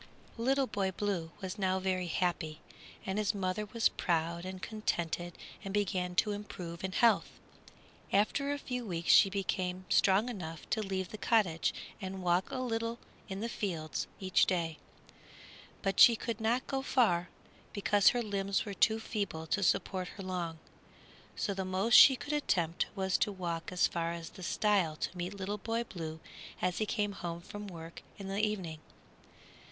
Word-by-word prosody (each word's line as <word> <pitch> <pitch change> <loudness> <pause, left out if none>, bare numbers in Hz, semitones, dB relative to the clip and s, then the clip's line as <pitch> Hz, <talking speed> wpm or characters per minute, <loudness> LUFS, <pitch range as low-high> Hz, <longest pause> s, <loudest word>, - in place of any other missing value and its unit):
Little 270 +3 +2
Boy 200 -6 -1
Blue 190 -3 -2
was 190 +2 -5
now 190 -1 +1
very 185 -1 -1
happy, 165 -2 -1 0.5
and 190 +2 -1
his 210 0 +1
mother 195 +2 -1
was 225 +2 +3
proud 170 0 -1
and 185 0 -6
contented 175 -5 -2 0.3
and 195 - -5
began 185 -3 0
to 210 +4 +3
improve 180 -5 -6
in 190 0 -2
health. 230 +2 +3 0.7
After 245 +8 +2
a 285 - -1
few 250 -3 -4
weeks 170 -5 0
she 195 - +8
became 185 -1 -2
strong 200 +4 +4
enough 165 -9 -6
to 220 - +1
leave 190 -3 -2
the 215 - -8
cottage 180 -11 +2 0.3
and 190 -1 -5
walk 175 +1 +2
a - - -4
little 230 -2 -2 0.3
in 195 +1 -4
the 230 - -1
fields 170 -8 -3
each 185 -1 +3
day; 165 -4 -1 1.0
but 195 -1 0
she 235 - +10
could 225 0 -4
not 235 +3 +1
go 270 -1 -2
far, 195 -10 +2 0.4
because 205 0 +4
her 245 -1 0
limbs 200 -2 -1
were 205 - -4
too 220 +3 +3
feeble 200 -8 -3
to 200 - 0
support 185 -1 +1
her 195 - -8
long, 175 -3 -3 0.8
so 200 - -1
the 190 0 -2
most 190 +5 0
she 265 - +10
could 290 +4 -5
attempt 175 - +1
was 190 -1 +1
to 210 - +2
walk 170 -3 -4
as 180 0 +3
far 170 0 -1
as 170 -1 -7
the - - -12
stile 190 -4 +2
to 170 - -4
meet 180 +3 -4
Little 200 +2 -3
Boy 230 +3 -1
Blue 160 -7 -6 0.4
as 180 -1 0
he 215 - 0
came 205 0 0
home 170 -3 -5
from 205 +3 -8
work 165 -2 -9 0.2
in 195 -1 -7
the 195 +2 0
evening. 185 -7 -2
190 Hz, 170 wpm, -32 LUFS, 175-210 Hz, 1.0 s, she